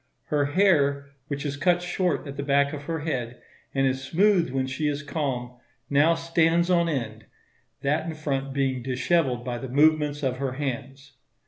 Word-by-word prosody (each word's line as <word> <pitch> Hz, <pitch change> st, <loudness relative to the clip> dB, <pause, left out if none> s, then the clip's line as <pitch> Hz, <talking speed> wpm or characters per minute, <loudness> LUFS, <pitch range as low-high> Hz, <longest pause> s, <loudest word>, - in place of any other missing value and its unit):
Her 145 Hz, -1 st, +2 dB
hair, 145 Hz, -5 st, +2 dB, 0.2 s
which 140 Hz, 0 st, -4 dB
is 145 Hz, -1 st, -2 dB
cut 175 Hz, +3 st, +3 dB
short 180 Hz, -2 st, -1 dB
at 140 Hz, -1 st, -7 dB
the 140 Hz, -, -3 dB
back 140 Hz, 0 st, +2 dB
of 145 Hz, -1 st, -6 dB
her 160 Hz, 0 st, -3 dB
head, 125 Hz, -6 st, -3 dB, 0.3 s
and 135 Hz, 0 st, +1 dB
is 130 Hz, 0 st, 0 dB
smooth 180 Hz, +3 st, +3 dB
when 130 Hz, 0 st, -1 dB
she 130 Hz, +4 st, -2 dB
is 145 Hz, +1 st, -2 dB
calm, 125 Hz, -5 st, -3 dB, 0.3 s
now 150 Hz, +4 st, +4 dB
stands 165 Hz, +1 st, +2 dB
on 170 Hz, -1 st, +3 dB
end; 110 Hz, -7 st, -4 dB, 0.6 s
that 150 Hz, +4 st, 0 dB
in 160 Hz, -, -4 dB
front 140 Hz, -3 st, -2 dB
being 135 Hz, -2 st, 0 dB
dishevelled 130 Hz, 0 st, 0 dB
by 120 Hz, -1 st, -3 dB
the 130 Hz, -, -6 dB
movements 150 Hz, +1 st, +3 dB
of 130 Hz, -1 st, 0 dB
her 135 Hz, -1 st, -2 dB
hands. 135 Hz, 0 st, -5 dB
140 Hz, 180 wpm, -26 LUFS, 130-160 Hz, 0.6 s, now